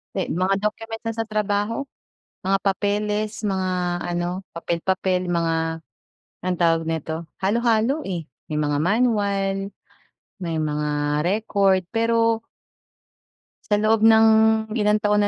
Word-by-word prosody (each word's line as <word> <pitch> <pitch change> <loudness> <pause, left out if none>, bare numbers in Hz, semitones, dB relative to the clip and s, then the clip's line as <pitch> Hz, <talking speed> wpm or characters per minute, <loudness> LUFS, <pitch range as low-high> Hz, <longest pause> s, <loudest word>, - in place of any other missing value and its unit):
Eh, 190 - -1
mga 185 +3 +1
document 225 +1 -3
niya 225 -1 -3
sa - - -14
trabaho? 215 +3 -1 0.6
Mga 195 +1 +2
papeles, 210 +2 -1
mga 190 -2 0 0.3
ano, 175 +2 -2
papel-papel, 180 +2 -1
yung 175 -1 0
mga, 165 -1 +1 0.9
anong 180 -1 -1
tawag 165 -1 +3
nito? 160 -1 -2 0.2
Halo-halo, 230 +7 +1
eh, 175 -5 -4 0.2
may 150 - -1
mga 145 -1 0
manual, 200 0 +1 0.8
may 165 -3 -3
mga 150 -1 -1
record. 195 -1 +2
Pero 230 0 +2 1.3
sa 210 - +3
loob 215 +2 +3
ng 220 0 +6 0.5
ilang 210 0 +3
taon 210 0 +3
195 Hz, 120 wpm, -23 LUFS, 175-215 Hz, 1.3 s, ng